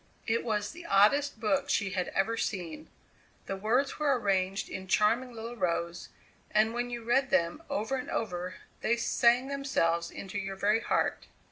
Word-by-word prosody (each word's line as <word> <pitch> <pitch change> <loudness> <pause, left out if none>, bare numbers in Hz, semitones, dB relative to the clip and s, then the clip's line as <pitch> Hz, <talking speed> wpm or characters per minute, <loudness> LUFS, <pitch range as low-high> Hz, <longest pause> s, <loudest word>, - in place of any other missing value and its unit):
It 230 +1 +1
was 210 -3 -1
the 340 +2 -10
oddest 220 +7 +4
book 275 +6 +1
she 200 -3 +1
had 185 -1 -1
ever 225 +4 0
seen. 195 - -4 0.6
The 195 - -3
words 235 +10 0
were 285 -4 +2
arranged 195 -2 0
in 190 0 -6
charming 230 +6 +2
little 230 +1 -7
rows, 170 -4 -2 0.4
and 215 +1 +3
when 240 +1 -2
you 240 -1 -5
read 265 +4 +2
them 170 -4 +1
over 225 +6 -1
and 255 - -5
over 180 -4 -3 0.3
they 235 - +2
sang 240 +2 +3
themselves 170 -12 0
into 200 +1 -6
your 195 0 -4
very 210 +3 +2
heart. - - 0
220 Hz, 165 wpm, -30 LUFS, 190-245 Hz, 0.6 s, oddest